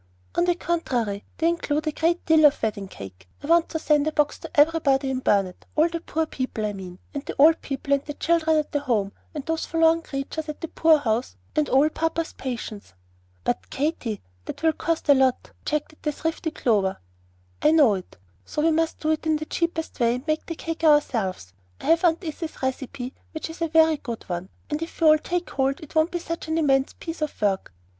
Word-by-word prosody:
"On 345 Hz, -, +2 dB
the 350 Hz, -1 st, +2 dB
contrary, 245 Hz, -, -1 dB
they 330 Hz, -, +2 dB
include 310 Hz, -3 st, 0 dB
a 310 Hz, -, +1 dB
great 335 Hz, +3 st, 0 dB
deal 315 Hz, -1 st, +6 dB
of 280 Hz, -, -2 dB
wedding 205 Hz, -3 st, -1 dB
cake. 95 Hz, -, -11 dB
I -, -, -5 dB
want 335 Hz, +2 st, +4 dB
to 320 Hz, -, -2 dB
send 300 Hz, -1 st, +2 dB
a -, -, +1 dB
box 300 Hz, -1 st, +1 dB
to -, -, -8 dB
everybody 290 Hz, -3 st, +3 dB
in 260 Hz, -, -1 dB
Burnet, 195 Hz, -7 st, 0 dB
all 315 Hz, +2 st, +4 dB
the 335 Hz, 0 st, -3 dB
poor 320 Hz, -1 st, -1 dB
people, 255 Hz, -7 st, -3 dB
I 210 Hz, -, -2 dB
mean, 185 Hz, -2 st, -8 dB, 0.2 s
and 285 Hz, -1 st, -4 dB
the -, -, -6 dB
old 315 Hz, +3 st, +6 dB
people 275 Hz, 0 st, -2 dB
and 280 Hz, 0 st, +2 dB
the 295 Hz, -, -7 dB
children 320 Hz, -1 st, +2 dB
at 305 Hz, -, -1 dB
the 290 Hz, -, +1 dB
Home 225 Hz, -8 st, 0 dB, 0.2 s
and 290 Hz, -2 st, -4 dB
those 325 Hz, 0 st, -2 dB
forlorn 325 Hz, 0 st, +3 dB
creatures 300 Hz, +2 st, -5 dB
at 300 Hz, -, -5 dB
the 330 Hz, -, -4 dB
poor 320 Hz, -1 st, +5 dB
house 240 Hz, -3 st, -1 dB, 0.2 s
and 300 Hz, -2 st, +1 dB
all 270 Hz, +3 st, +5 dB
papa's 325 Hz, +1 st, -2 dB
patients." 225 Hz, -, -6 dB, 0.5 s
"But, 95 Hz, +2 st, -2 dB
Katy, 265 Hz, -, -2 dB, 0.2 s
that -, -, -7 dB
will 320 Hz, -1 st, +4 dB
cost 330 Hz, 0 st, -2 dB
a 285 Hz, -, +8 dB
lot," 265 Hz, -2 st, +2 dB
objected 300 Hz, 0 st, -3 dB
the 300 Hz, -, 0 dB
thrifty 325 Hz, +2 st, -2 dB
Clover. 205 Hz, -10 st, +1 dB, 0.6 s
"I -, -, +5 dB
know 300 Hz, -8 st, +6 dB
it; 185 Hz, -2 st, -7 dB, 0.3 s
so 300 Hz, -, -2 dB
we 330 Hz, -, +4 dB
must 320 Hz, 0 st, 0 dB
do 310 Hz, -, +1 dB
it 315 Hz, 0 st, -1 dB
in 315 Hz, -, +3 dB
the 310 Hz, 0 st, -3 dB
cheapest 330 Hz, -1 st, -2 dB
way, 235 Hz, 0 st, +3 dB
and 250 Hz, +3 st, -7 dB
make 310 Hz, 0 st, -1 dB
the 330 Hz, -, -4 dB
cake 330 Hz, +1 st, -5 dB
ourselves. 225 Hz, -, +2 dB, 0.3 s
I -, -, -10 dB
have 330 Hz, +1 st, +4 dB
Aunt 340 Hz, +1 st, +3 dB
Izzy's 315 Hz, -2 st, -6 dB
recipe, 260 Hz, 0 st, -3 dB, 0.2 s
which 315 Hz, +1 st, -5 dB
is 335 Hz, -, -12 dB
a 330 Hz, -, +2 dB
very 320 Hz, -1 st, +4 dB
good 235 Hz, -5 st, -6 dB
one; 175 Hz, +1 st, -5 dB, 0.2 s
and 300 Hz, +1 st, -3 dB
if 330 Hz, -, -6 dB
we 330 Hz, -, +2 dB
all 310 Hz, 0 st, +6 dB
take 350 Hz, +2 st, -3 dB
hold, 270 Hz, 0 st, 0 dB
it 310 Hz, -, -12 dB
won't 315 Hz, +1 st, +3 dB
be 355 Hz, -, -2 dB
such 335 Hz, -1 st, -5 dB
an 320 Hz, +1 st, 0 dB
immense 270 Hz, -4 st, +2 dB
piece 330 Hz, -1 st, -7 dB
of 305 Hz, -, -3 dB
work. 200 Hz, -2 st, 0 dB
300 Hz, 220 wpm, -25 LUFS, 255-325 Hz, 0.6 s, a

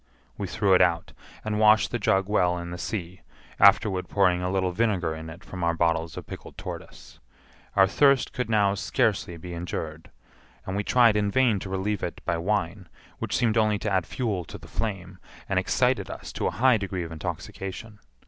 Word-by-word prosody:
We -, -, -4 dB
threw 100 Hz, -2 st, +2 dB
it 90 Hz, -, +6 dB
out, 85 Hz, -2 st, +1 dB, 0.3 s
and 105 Hz, -1 st, -1 dB
washed 110 Hz, 0 st, +5 dB
the 120 Hz, -, -1 dB
jug 95 Hz, -1 st, +2 dB
well 90 Hz, -4 st, +2 dB
in 85 Hz, 0 st, -6 dB
the 90 Hz, -, -6 dB
sea, 90 Hz, -3 st, -5 dB, 0.4 s
afterward 100 Hz, -1 st, +4 dB
pouring 90 Hz, -3 st, +2 dB
a 90 Hz, -, -1 dB
little 95 Hz, -1 st, 0 dB
vinegar 95 Hz, -5 st, 0 dB
in 80 Hz, 0 st, -8 dB
it 85 Hz, +3 st, -11 dB
from 90 Hz, -2 st, -7 dB
our 85 Hz, 0 st, +1 dB
bottles 80 Hz, -1 st, 0 dB
of -, -, -6 dB
pickled -, -, -10 dB
tortoise. -, -, -9 dB, 0.6 s
Our 95 Hz, -1 st, +6 dB
thirst 140 Hz, +7 st, +3 dB
could 125 Hz, -3 st, -3 dB
now 105 Hz, -3 st, +3 dB
scarcely 90 Hz, -3 st, 0 dB
be 90 Hz, +2 st, -8 dB
endured, 80 Hz, -2 st, -5 dB, 0.6 s
and 95 Hz, -, -4 dB
we 100 Hz, -, -1 dB
tried 120 Hz, -1 st, +4 dB
in 105 Hz, -1 st, +1 dB
vain 120 Hz, -2 st, +3 dB
to 95 Hz, -, -7 dB
relieve 95 Hz, +2 st, -2 dB
it 85 Hz, -, -4 dB
by 85 Hz, -, 0 dB
wine, 95 Hz, -1 st, -2 dB, 0.3 s
which -, -, -1 dB
seemed 115 Hz, -2 st, +1 dB
only 105 Hz, -1 st, +2 dB
to 105 Hz, 0 st, -3 dB
add 95 Hz, -3 st, +1 dB
fuel 105 Hz, -8 st, -2 dB
to -, -, -9 dB
the -, -, -14 dB
flame, 95 Hz, -4 st, -4 dB, 0.3 s
and -, -, +1 dB
excited -, -, +1 dB
us -, -, -8 dB
to -, -, -1 dB
a -, -, -4 dB
high 125 Hz, 0 st, +5 dB
degree 95 Hz, -3 st, -3 dB
of 85 Hz, -, -7 dB
intoxication. 95 Hz, +6 st, -6 dB
95 Hz, 195 wpm, -26 LUFS, 90-105 Hz, 0.6 s, it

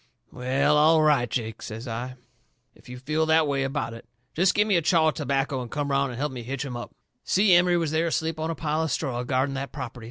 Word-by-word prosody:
"Well, 140 Hz, +4 st, +1 dB
all 155 Hz, +1 st, +5 dB
right, 140 Hz, -6 st, +3 dB
Jake," 115 Hz, -2 st, -4 dB
says 115 Hz, +4 st, -7 dB
I, 120 Hz, +3 st, -5 dB, 0.6 s
"if -, -, -19 dB
you 125 Hz, -, -7 dB
feel 155 Hz, +5 st, -1 dB
that 160 Hz, -1 st, +4 dB
way 140 Hz, -1 st, 0 dB
about 135 Hz, -3 st, -2 dB
it. 115 Hz, 0 st, -12 dB, 0.3 s
Jest 180 Hz, +3 st, +2 dB
give 210 Hz, +1 st, +3 dB
me 205 Hz, -, +2 dB
a 170 Hz, -, +3 dB
chaw 160 Hz, 0 st, +3 dB
of -, -, -3 dB
tobacco 135 Hz, -1 st, -1 dB
and 120 Hz, -, -7 dB
come 145 Hz, +1 st, -3 dB
around 140 Hz, 0 st, +1 dB
and 120 Hz, -, -7 dB
help 145 Hz, +2 st, -2 dB
me 125 Hz, -2 st, -6 dB
hitch 135 Hz, +4 st, -4 dB
'em 125 Hz, -3 st, -6 dB
up." 120 Hz, -, -6 dB, 0.3 s
Si 195 Hz, 0 st, +3 dB
Emery 175 Hz, 0 st, +4 dB
was 165 Hz, -3 st, -1 dB
there 160 Hz, +2 st, +1 dB
asleep 160 Hz, -1 st, -2 dB
on 160 Hz, +1 st, -2 dB
a 165 Hz, -, -2 dB
pile 155 Hz, +1 st, -1 dB
of 160 Hz, -, -1 dB
straw 130 Hz, -6 st, -2 dB
guarding 130 Hz, +2 st, 0 dB
that 135 Hz, 0 st, -5 dB
property. 125 Hz, -3 st, -7 dB
140 Hz, 250 wpm, -25 LUFS, 130-160 Hz, 0.6 s, all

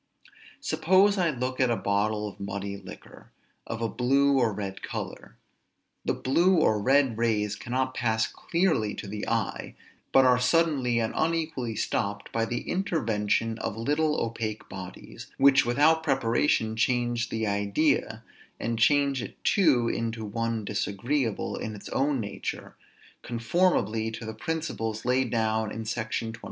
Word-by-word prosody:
Suppose 195 Hz, +3 st, +3 dB
I 175 Hz, -2 st, +3 dB
look 130 Hz, -2 st, -3 dB
at 130 Hz, -2 st, +3 dB
a 120 Hz, -, +2 dB
bottle 105 Hz, +1 st, 0 dB
of 100 Hz, -, -10 dB
muddy 100 Hz, 0 st, -4 dB
liquor, 100 Hz, -2 st, -12 dB, 0.4 s
of 115 Hz, 0 st, -4 dB
a -, -, +2 dB
blue 135 Hz, +4 st, +2 dB
or 115 Hz, -3 st, +2 dB
red 100 Hz, -1 st, -5 dB
color; -, -, -6 dB, 0.7 s
the -, -, 0 dB
blue 175 Hz, +8 st, +3 dB
or 110 Hz, -10 st, +3 dB
red 130 Hz, -1 st, +3 dB
rays 105 Hz, -3 st, +1 dB
cannot 130 Hz, +3 st, -2 dB
pass 110 Hz, -3 st, +1 dB
clearly 165 Hz, -, 0 dB
to -, -, -7 dB
the 105 Hz, +1 st, -5 dB
eye, -, -, -2 dB, 0.4 s
but 135 Hz, -1 st, +6 dB
are 125 Hz, -1 st, +5 dB
suddenly 135 Hz, -3 st, +2 dB
and 115 Hz, -1 st, 0 dB
unequally 160 Hz, -8 st, -1 dB
stopped 100 Hz, -2 st, -2 dB
by 115 Hz, 0 st, 0 dB
the 120 Hz, +1 st, -4 dB
intervention 115 Hz, -, 0 dB
of 105 Hz, -, -4 dB
little 150 Hz, +6 st, +1 dB
opaque 110 Hz, -2 st, -3 dB
bodies, 95 Hz, -2 st, -9 dB
which 140 Hz, -2 st, +5 dB
without 150 Hz, +6 st, +4 dB
preparation 120 Hz, -5 st, +1 dB
change 120 Hz, 0 st, 0 dB
the 110 Hz, 0 st, -2 dB
idea, 105 Hz, +3 st, 0 dB, 0.4 s
and 115 Hz, 0 st, -2 dB
change 140 Hz, +1 st, +3 dB
it -, -, -9 dB
too 145 Hz, -, +3 dB
into 115 Hz, -1 st, -2 dB
one 115 Hz, +1 st, -2 dB
disagreeable 110 Hz, +4 st, -1 dB
in 110 Hz, -1 st, -5 dB
its 100 Hz, -, -10 dB
own 140 Hz, 0 st, +1 dB
nature, 105 Hz, -2 st, -5 dB, 0.5 s
conformably 115 Hz, -, +1 dB
to 110 Hz, 0 st, -7 dB
the 110 Hz, -, -5 dB
principles 115 Hz, -5 st, -3 dB
laid 125 Hz, 0 st, +2 dB
down 110 Hz, -1 st, 0 dB
in 110 Hz, 0 st, -5 dB
Sect. 110 Hz, 0 st, -2 dB
24. 115 Hz, 0 st, -5 dB
115 Hz, 145 wpm, -27 LUFS, 110-140 Hz, 0.7 s, but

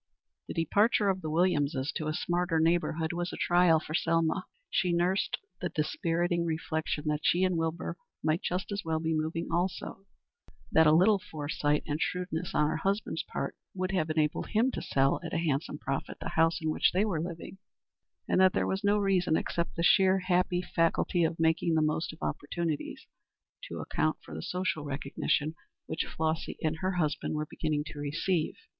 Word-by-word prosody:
The -, -, -6 dB
departure 205 Hz, +5 st, +3 dB
of 190 Hz, -1 st, 0 dB
the 155 Hz, -, -4 dB
Williamses 155 Hz, -4 st, +1 dB
to 155 Hz, -, -4 dB
a 155 Hz, -, 0 dB
smarter 175 Hz, -1 st, 0 dB
neighborhood 165 Hz, 0 st, +1 dB
was 175 Hz, 0 st, -2 dB
a -, -, -6 dB
trial 175 Hz, -2 st, +4 dB
for 155 Hz, -, -8 dB
Selma. 165 Hz, +2 st, +1 dB, 0.2 s
She 180 Hz, -, +2 dB
nursed 180 Hz, +3 st, +1 dB, 0.2 s
the 180 Hz, -, -2 dB
dispiriting 170 Hz, +2 st, 0 dB
reflection 160 Hz, -2 st, -2 dB
that 150 Hz, 0 st, 0 dB
she 175 Hz, +3 st, +3 dB
and 185 Hz, -1 st, +2 dB
Wilbur 165 Hz, 0 st, -2 dB, 0.3 s
might 155 Hz, +3 st, +1 dB
just 185 Hz, +3 st, -2 dB
as 200 Hz, 0 st, -3 dB
well 160 Hz, -1 st, -1 dB
be 160 Hz, 0 st, -1 dB
moving 160 Hz, +2 st, -2 dB
also; 185 Hz, +2 st, -2 dB, 0.6 s
that 160 Hz, 0 st, +6 dB
a -, -, +7 dB
little 190 Hz, +6 st, +5 dB
foresight 150 Hz, -5 st, -1 dB
and 150 Hz, +1 st, -2 dB
shrewdness 180 Hz, -1 st, -2 dB
on 150 Hz, -, +4 dB
her 155 Hz, -, -1 dB
husband's 195 Hz, +6 st, -1 dB
part -, -, -4 dB, 0.2 s
would 185 Hz, 0 st, -1 dB
have 160 Hz, -5 st, 0 dB
enabled 155 Hz, -1 st, 0 dB
him 230 Hz, +4 st, +2 dB
to -, -, -4 dB
sell 135 Hz, 0 st, +2 dB
at 170 Hz, -, -4 dB
a -, -, +2 dB
handsome 155 Hz, -2 st, -1 dB
profit 135 Hz, -2 st, -4 dB
the -, -, -4 dB
house 165 Hz, +1 st, +2 dB
in 160 Hz, -2 st, -1 dB
which -, -, +2 dB
they 190 Hz, +4 st, +3 dB
were 180 Hz, -8 st, -1 dB
living; 170 Hz, +3 st, -7 dB, 0.7 s
and -, -, +3 dB
that 185 Hz, -1 st, +6 dB
there -, -, +1 dB
was 190 Hz, +1 st, -2 dB
no 205 Hz, +1 st, +3 dB
reason, 185 Hz, -5 st, +2 dB
except 170 Hz, 0 st, -2 dB
the 170 Hz, -, -1 dB
sheer, 190 Hz, +1 st, +5 dB
happy 180 Hz, -1 st, +1 dB
faculty 170 Hz, +1 st, +1 dB
of 165 Hz, 0 st, 0 dB
making 165 Hz, +1 st, +2 dB
the 160 Hz, -, +3 dB
most 155 Hz, +1 st, 0 dB
of 155 Hz, -, -12 dB
opportunities, 160 Hz, +1 st, -3 dB, 0.6 s
to -, -, -7 dB
account -, -, -1 dB
for 80 Hz, -, -10 dB
the 80 Hz, -, -5 dB
social 180 Hz, -, -2 dB
recognition 145 Hz, +2 st, -1 dB, 0.3 s
which 160 Hz, -, -2 dB
Flossy 160 Hz, 0 st, -2 dB
and 160 Hz, 0 st, 0 dB
her 185 Hz, +4 st, -1 dB
husband 155 Hz, -3 st, -1 dB
were 155 Hz, 0 st, -1 dB
beginning 150 Hz, -1 st, -2 dB
to 150 Hz, -1 st, -8 dB
receive. 155 Hz, +3 st, -1 dB
165 Hz, 185 wpm, -30 LUFS, 155-180 Hz, 0.7 s, a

